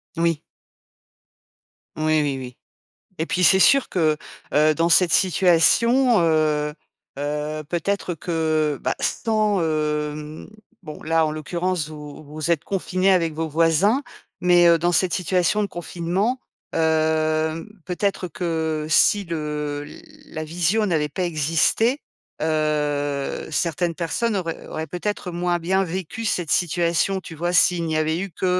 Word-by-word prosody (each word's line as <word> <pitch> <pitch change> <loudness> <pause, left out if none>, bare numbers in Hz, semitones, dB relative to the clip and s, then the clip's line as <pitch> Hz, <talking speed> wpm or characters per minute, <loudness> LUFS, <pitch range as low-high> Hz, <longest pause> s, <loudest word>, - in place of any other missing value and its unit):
Oui. 165 -2 0 1.5
Oui, 155 0 +1
oui, 140 -2 -1
oui. 125 -2 -9 0.6
Et 160 - -1
puis, 180 +1 -1
c'est 190 +4 +6
sûr 275 +6 +5
que, 155 -4 +1 0.4
heu, 155 +1 +4
dans 165 +2 +1
cette 170 0 +4
situation, 200 - +4
heu, 155 -2 +1 0.4
heu, 150 +2 -3
peut-être 180 +2 -2
que, 155 -3 -1
bah, - - -1
sans, 215 -3 0
heu 150 -1 -3 0.4
bon, 150 - -9
là, 160 0 +2
en 155 - -2
l'occurrence, 170 +1 -3
vous 150 -1 -10
vous 155 +3 -3
êtes 165 -4 0
confinés 190 0 0
avec 165 -4 +2
vos 160 +1 -3
voisins, 165 - +2 0.4
mais, 175 -1 +5
heu, 170 0 +6
dans 175 +2 +1
cette 175 +1 +2
situation 180 +3 +1
de 205 - 0
confinement, 180 +7 -2 0.3
hem, 160 +1 0 0.2
peut-être 185 +1 -2
que 160 -2 -2
si 200 +5 +4
le 150 -3 -4 0.4
la 155 - -6
visio 175 +7 0
n'avait 155 -5 0
pas 180 +6 -3
existé, 170 - +1 0.4
heu, 150 -2 -1
certaines 170 +1 -1
personnes 195 +7 -1
auraient 165 -4 -4
auraient, 160 0 -5
peut-être, 180 +2 -4
moins 175 0 0
bien 190 +3 +1
vécu 185 +5 -5
cette 175 -7 -1
situation, 175 +2 +1
tu 165 - -10
vois? 175 +3 -2
S'il 175 -1 +3
n'y 160 -1 -2
avait 155 +1 0
eu 195 - -4
que, 185 - -4
165 Hz, 140 wpm, -22 LUFS, 155-180 Hz, 1.5 s, c'est